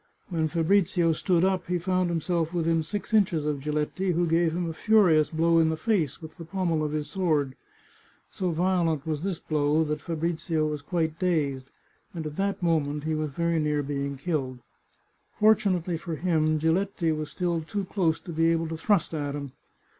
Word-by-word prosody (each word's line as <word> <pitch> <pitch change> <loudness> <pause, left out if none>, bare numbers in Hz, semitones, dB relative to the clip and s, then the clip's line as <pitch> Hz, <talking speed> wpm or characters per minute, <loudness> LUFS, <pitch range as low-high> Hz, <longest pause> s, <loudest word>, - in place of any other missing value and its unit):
When 160 -3 0
Fabrizio 170 +1 +2
stood 175 +2 +2
up 190 -2 0
he 180 0 0
found 185 0 0
himself 170 0 -1
within 165 -1 +1
six 205 +8 -5
inches 180 -8 +3
of 150 -2 -1
Giletti, 150 +6 -1
who 175 +1 +1
gave 165 0 +2
him 175 +1 -2
a 165 - -3
furious 180 -6 +4
blow 165 +1 +3
in 160 -1 +4
the 160 - -1
face 165 - -1
with 160 +2 -10
the 170 - -8
pommel 170 -2 -1
of 150 - -2
his 150 -1 -2
sword. 155 -8 0 0.8
So 185 -3 -2
violent 170 -3 +1
was 155 -2 -2
this 190 -1 -2
blow 150 0 +1
that 150 -1 -3
Fa 165 +2 -4
brizio 160 -1 -1
was 150 -1 -3
quite 160 0 -2
dazed, 145 -7 0 0.5
and 160 -2 -4
at 150 -1 -5
that 195 -1 -1
moment 150 -3 0
he 160 0 -1
was 155 -1 -1
very 170 +3 0
near 150 -1 0
being 140 0 -3
killed. 135 -5 -2 0.8
Fortunately 185 -5 +3
for 165 0 -5
him, 155 -2 +1
Giletti 165 +2 +1
was 155 -1 -3
still 175 -2 -1
too 195 +5 -4
close 175 -4 0
to 175 - -8
be 165 +1 +2
able 165 -1 0
to 160 - -4
thrust 190 +1 +1
at 145 -2 -2
him. 140 -2 -6
165 Hz, 190 wpm, -27 LUFS, 155-180 Hz, 0.8 s, furious